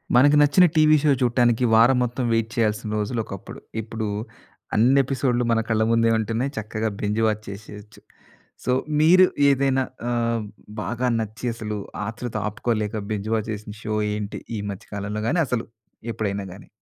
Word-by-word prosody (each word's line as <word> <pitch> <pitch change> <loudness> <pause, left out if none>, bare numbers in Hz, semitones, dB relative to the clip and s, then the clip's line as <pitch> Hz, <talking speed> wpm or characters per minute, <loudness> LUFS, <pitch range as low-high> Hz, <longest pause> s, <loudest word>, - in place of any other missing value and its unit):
మనకి 145 +4 +6
నచ్చిన 145 +5 +6
TV 155 -1 +6
show 150 - +4
చూడటానికి, 120 -1 +2
వారం 120 +3 +6
మొత్తం 125 +1 -2
వెయిట్ 115 0 +1
చేయాల్సిన 110 -2 0
రోజులొకప్పుడు. 105 -3 -4 0.2
ఇప్పుడు 110 0 -4 0.7
అన్ని 125 +6 +4
ఎపిసోడ్‌లు 125 -2 0
మన 115 - +3
కళ్ళ 110 -1 +2
ముందే 115 0 +3
ఉంటున్నాయి. 115 +5 -1
చక్కగా 110 +1 -2
బింజ్ 105 +2 0
వాచ్ 110 0 -1
చేసేయొచ్చు. 105 +1 -10 0.7
సో, - - +1 0.3
మీరు 180 +4 +7 0.2
ఏదైనా 135 -1 +2 0.3
ఆహ్, 115 -1 0 0.4
బాగా 120 +3 -2
నచ్చి 110 +2 -5
అసలు 105 -2 -4 0.3
ఆత్రుత 120 +1 -6
ఆపుకోలేక, 110 0 -2 0.2
బింజ్ 105 0 -3
వాచ్ 110 0 -2
చేసిన 105 0 -8
షో, 110 - -2 0.2
ఏంటి? 105 -1 -4 0.2
ఈ - - -3
మధ్య 95 - -9
కాలంలో 100 +1 -3
గాని, 165 +7 +2
అసలు 125 -2 -1 0.5
ఎప్పుడైనా 100 -2 -2
గాని? 95 - -13
115 Hz, 150 wpm, -23 LUFS, 105-125 Hz, 0.7 s, మీరు